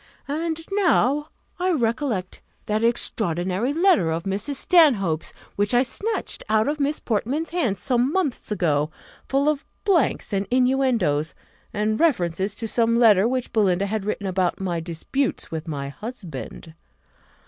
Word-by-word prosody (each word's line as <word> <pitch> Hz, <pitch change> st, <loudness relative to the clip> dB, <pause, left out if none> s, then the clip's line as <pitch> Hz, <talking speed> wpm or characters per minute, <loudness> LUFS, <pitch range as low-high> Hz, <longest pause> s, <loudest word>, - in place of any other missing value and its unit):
And 320 Hz, +3 st, -2 dB
now 305 Hz, -7 st, +2 dB, 0.3 s
I 365 Hz, +1 st, +1 dB
recollect 235 Hz, -, -1 dB, 0.2 s
that 215 Hz, +1 st, 0 dB
extraordinary 195 Hz, -, 0 dB
letter 325 Hz, -, +3 dB
of 165 Hz, +1 st, -2 dB
Mrs. 200 Hz, +9 st, -2 dB
Stanhope's 235 Hz, -, +3 dB, 0.2 s
which 205 Hz, +3 st, +1 dB
I 245 Hz, -, +5 dB
snatched 425 Hz, -, -3 dB
out 220 Hz, 0 st, +3 dB
of 295 Hz, +1 st, -1 dB
Miss 290 Hz, +2 st, 0 dB
Portman's 265 Hz, +9 st, -2 dB
hands 245 Hz, -, 0 dB
some 250 Hz, +4 st, +1 dB
months 315 Hz, -, -2 dB
ago, 155 Hz, -7 st, +1 dB, 0.4 s
full 275 Hz, +2 st, +2 dB
of 295 Hz, -2 st, +1 dB, 0.2 s
blanks, 340 Hz, -, +1 dB
and 195 Hz, 0 st, 0 dB
inuendoes, 250 Hz, -, +2 dB, 0.4 s
and 215 Hz, +1 st, -1 dB
references 195 Hz, -, +1 dB
to 225 Hz, -, -4 dB
some 230 Hz, +1 st, +2 dB
letter 220 Hz, -3 st, +6 dB
which 255 Hz, 0 st, -2 dB
Belinda 195 Hz, -3 st, +2 dB
had 210 Hz, 0 st, -2 dB
written 205 Hz, 0 st, -3 dB
about 185 Hz, -2 st, 0 dB
my 180 Hz, -3 st, -2 dB
disputes 170 Hz, -, -3 dB
with 160 Hz, 0 st, -5 dB
my 140 Hz, -3 st, -4 dB
husband! 170 Hz, -, -8 dB
225 Hz, 140 wpm, -23 LUFS, 185-280 Hz, 0.4 s, letter